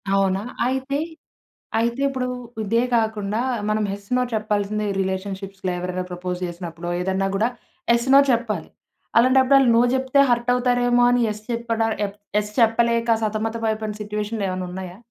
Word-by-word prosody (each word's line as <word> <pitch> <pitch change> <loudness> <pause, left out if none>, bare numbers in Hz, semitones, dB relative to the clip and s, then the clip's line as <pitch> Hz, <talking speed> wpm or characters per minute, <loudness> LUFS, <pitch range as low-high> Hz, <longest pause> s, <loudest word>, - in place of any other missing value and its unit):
అవునా! 195 0 +1 0.2
అయితే, 265 +2 -1 0.8
అయితే 235 +3 0
ఇప్పుడు 260 -2 -2 0.3
ఇదే 230 +3 +1
గాకుండా, 220 -1 0 0.3
మనం 215 0 +1
యెస్, 200 0 -8
నో - - +2
చెప్పాల్సింది 210 0 -1
రిలేషన్‌షిప్స్‌లో 190 0 -3
ఎవరైనా 180 +1 -3
ప్రపోజ్ 180 0 -4
జేసినప్పుడో 175 -1 -6
ఏదన్నా 190 +1 0
గూడా 220 +4 +2 0.4
యెస్, 235 +1 +1
నో 280 - +9
చెప్పాలి. 220 -8 -1 0.5
అలాంటప్పుడు 260 +3 +5
ఆళ్ళు 265 -3 +4
నో 235 - +6
జెప్తే 265 +1 +2
హర్ట్ 240 +1 +2
అవుతారేమో 245 -1 +2
అని 245 0 +3
యెస్ 210 0 -5
చెప్పడా 230 -1 0 0.2
ఎఫ్ 200 +1 -11 0.2
యెస్ 210 0 -2
చెప్పలేక 235 +1 +3
సతమత 220 +1 -1
పడిపోయిన 215 -1 -1
సిట్యుయేషన్‌లు 210 0 -3
ఏమన్నా 185 0 -3
ఉన్నయా? 185 -1 -7
215 Hz, 145 wpm, -22 LUFS, 195-235 Hz, 0.8 s, నో